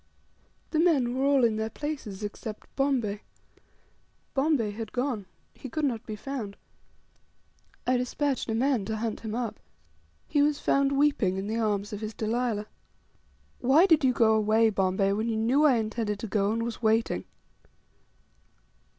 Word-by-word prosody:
The 310 - +1
men 280 -8 +3
were 265 - 0
all 275 -2 +4
in 225 -2 +3
their 220 0 -2
places 225 -7 -5
except 210 +1 -7
Bombay. 245 -7 0 1.1
Bombay 270 -6 +1
had 220 +1 -6
gone; 245 -6 -2 0.3
he 265 - -9
could 305 +5 -1
not 235 -4 -2
be 215 - -4
found. 215 -3 -6 1.3
I 255 0 +3
despatched 260 +1 -1
a 220 - 0
man 255 -2 +1
to 220 - -2
hunt 220 0 -3
him 220 -1 -5
up. 230 -3 -3 0.7
He 290 - +2
was 295 0 +2
found 275 0 +2
weeping 275 -10 +2
in 195 - -3
the 220 +2 -2
arms 205 -2 -1
of 210 - -5
his 215 -1 -5
Delilah. 220 -1 -1 0.9
"Why 275 +8 +5
did 320 -6 +4
you 260 - +5
go 225 -3 +4
away, 220 +1 +3
Bombay, 195 0 +1
when 220 +3 -1
you 225 - -1
knew 255 +7 +3
I 275 -4 +6
intended 220 -2 -1
to 225 - -4
go, 200 0 +1
and 230 +1 -1
was 235 0 -5
waiting?" 225 0 +1
230 Hz, 160 wpm, -28 LUFS, 215-270 Hz, 1.3 s, I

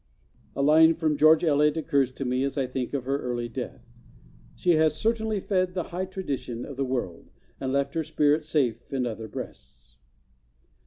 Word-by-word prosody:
A 140 - 0
line 160 +3 +6
from 155 -2 0
George 155 +3 +5
Eliot 150 -1 +3
occurs 140 -4 +1
to 135 - -5
me 125 +1 0
as 140 +1 -2
I 135 - +1
think 125 -1 -4
of 130 -3 -3
her 135 +1 0
early 120 -1 -3
death: 120 +1 -7 0.7
'She 180 - +1
has 155 -2 +3
certainly 220 -2 0
fed 185 -2 -1
the 180 - -3
high 185 +2 -1
tradition 140 -10 -5
of 140 - -8
the 135 - -1
world 120 -10 -4 0.3
and 130 - -2
left 140 0 0
her 165 -1 -1
spirit 150 0 +2
safe 130 -7 -1
in 130 -2 -1
other 110 -1 -5
breasts. - - -10
140 Hz, 180 wpm, -26 LUFS, 130-160 Hz, 0.7 s, line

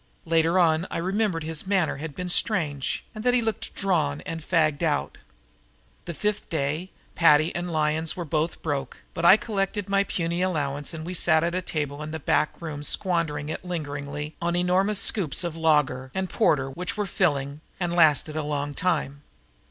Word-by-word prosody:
Later 165 +1 +2
on 165 -1 +3
I - - -3
remembered 190 -1 0
his 160 +2 -5
manner 190 -7 +1
had 150 0 -7
been 180 0 -4
strange 160 - 0
and 215 -1 -7
that 245 0 +3
he 245 - +3
looked 220 -2 -3
drawn 155 -7 0
and 165 0 -6
fagged 155 -2 +1
out. 150 -4 -1 0.9
The 170 - -5
fifth 210 +3 -2
day 155 +4 -2 0.2
Paddy 155 0 +4
and 175 0 -3
Lyons 155 0 0
were 175 - -3
both 155 +2 -2
broke, 140 -5 -3 0.2
but 165 - -2
I 190 +4 +9
collected 205 -2 -2
my 195 0 +3
puny 170 -2 -2
allowance 145 -6 -1
and 160 0 -6
we 180 - -5
sat 160 -2 +4
at 170 0 0
a 185 - -1
table 150 -4 -3
in 150 - -5
the 160 +1 -5
back 150 +1 0
room 155 -3 -6
squandering 150 -2 +1
it 160 - -5
lingeringly 150 -3 -5
on 170 0 0
enormous 185 +3 +2
scoops 180 -7 +2
of 170 -2 -3
lager 150 -5 +2
and 190 -1 -2
porter 145 -11 +2
which 180 +9 -3
were 210 - 0
filling 145 -6 0 0.2
and 175 -2 -1
lasted 155 -2 +4
a 155 - -1
long 145 -1 -2
time. 145 -4 -1
165 Hz, 185 wpm, -25 LUFS, 150-180 Hz, 0.9 s, I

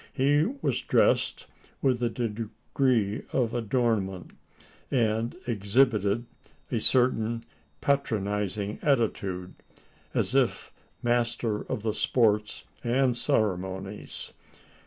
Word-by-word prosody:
He 145 +4 +3 0.2
was - - +1
dressed - - +2 0.4
with 130 -3 +2
a 120 - +2
degree 115 0 -1
of 120 -3 +1
adornment; 110 -5 0 0.6
and 115 +1 +1
exhibited 110 0 +2 0.5
a - - 0
certain 115 -2 +3 0.4
patronising 105 -6 -1
attitude, 100 -9 0 0.6
as - - +1
if - - +1 0.3
master 120 -2 0
of 105 - -2
the 110 -2 0
sports 105 -3 +1 0.2
and 125 +1 +2
ceremonies! 95 -3 -2
115 Hz, 90 wpm, -28 LUFS, 105-125 Hz, 0.6 s, He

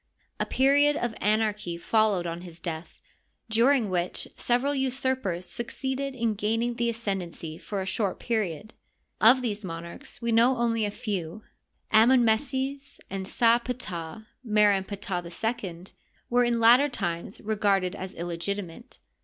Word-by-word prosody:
A - - 0
period 285 +2 +4
of 240 -5 -2
anarchy 210 -4 0
followed 210 -1 +2
on 170 0 -4
his 170 -2 -8
death, 165 -1 -6 0.5
during 240 +1 +4
which 180 -1 -2
several 250 +4 +1
usurpers 260 -9 -1
succeeded 265 +5 -3
in 230 -3 0
gaining 225 +4 0
the 235 0 0
ascendency 190 -8 -4
for 200 -2 -4
a - - -6
short 195 0 -1
period. 215 -2 -2 0.5
Of 250 +4 +6
these 215 -3 -2
monarchs 170 -1 -7
we 235 -1 -1
know 235 +3 +4
only 230 -2 +1
a - - -1
few. 205 -3 -4 0.5
Amon 240 +3 +6
meses 270 +4 -1
and 190 -1 -4
Sa 235 +2 +4
Ptah, 215 -7 -5 0.2
Mer 210 -3 +4
en 195 -1 0
Ptah 190 -3 -4 0.4
II, 175 -2 -6 0.5
were 245 +1 +4
in 240 -1 +1
later 245 +5 +6
times 175 -6 -4
regarded 200 -4 +1
as 185 +1 -7
illegitimate. 175 +5 -5
220 Hz, 140 wpm, -27 LUFS, 185-240 Hz, 0.5 s, Of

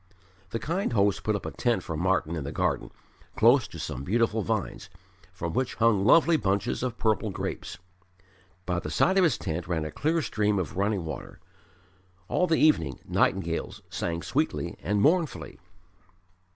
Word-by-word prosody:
The 115 - -2
kind 170 - -2
host 100 -1 +2
put 105 +1 0
up 100 - -5
a - - -3
tent 120 -2 0
for 80 - -4
Martyn 85 -1 0
in 75 - -3
the 70 - -5
garden, - - -1 0.5
close 120 +3 +5
to - - -10
some 65 - -5
beautiful 115 +4 +1
vines, 110 -1 -3 0.4
from 85 -1 -5
which 130 +5 -1
hung 110 -4 +3
lovely 165 +8 +5
bunches 100 -1 -1
of 125 -2 -3
purple 110 -1 +1
grapes. 95 - -5 0.9
By 90 0 -1
the - - -6
side 190 +1 +3
of - - +5
his 160 -9 +3
tent 80 +1 -4
ran 80 -3 -1
a 75 - -5
clear 160 - 0
stream 105 -3 0
of 90 -3 -3
running 100 -2 0
water. 80 - -7 0.9
All 180 - +2
the 160 -1 +2
evening 80 - +3
nightingales - - 0
sang 85 -1 -3
sweetly - - -1
and 100 +6 0
mournfully. 165 0 +1
105 Hz, 165 wpm, -27 LUFS, 90-125 Hz, 0.9 s, close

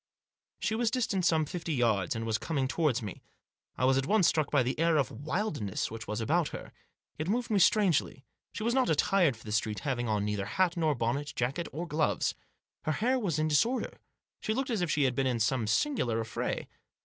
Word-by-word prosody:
She 220 - -1
was 230 +1 +1
distant 220 -7 0
some 160 -2 +3
fifty 165 0 -3
yards, 110 -6 +1
and 115 0 -3
was 110 -1 0
coming 135 +1 -1
towards 135 -5 0
me. 100 - -7 0.6
I 125 - +1
was 135 +1 +4
at 135 - -3
once 210 -5 +4
struck 155 -3 +1
by 145 -3 +3
the 130 +4 -2
air 165 -1 +3
of 135 -6 +1
wild 155 - -3
ness 100 0 -2
which 110 0 -7
was 105 +1 -3
about 155 +8 +1
her. - - -8 0.5
It 155 - -2
moved 235 +4 -1
me 205 - +3
strangely. 180 -9 +2 0.3
She - - -5
was 235 +1 +1
not 260 -1 +2
attired 160 - +3
for - - -16
the 105 - -7
street, 105 -1 -1
having 120 -4 -2
on 105 -1 0
neither 105 -1 -2
hat 185 - +1
nor 160 -3 +1
bonnet, 140 +5 -2
jacket 135 +8 -1
or 170 +4 -5
gloves. 155 -1 0 0.5
Her 155 - +1
hair 250 - +1
was 180 - -1
in 155 0 +1
disorder. 190 - +1 0.4
She 215 - -2
looked 270 +1 -1
as 220 -5 0
if 175 - 0
she 150 -1 +2
had 130 -2 +2
been 135 +1 0
in 125 -2 0
some 115 0 +1
singular 120 - +1
affray. 110 -1 -3
150 Hz, 220 wpm, -30 LUFS, 120-180 Hz, 0.6 s, was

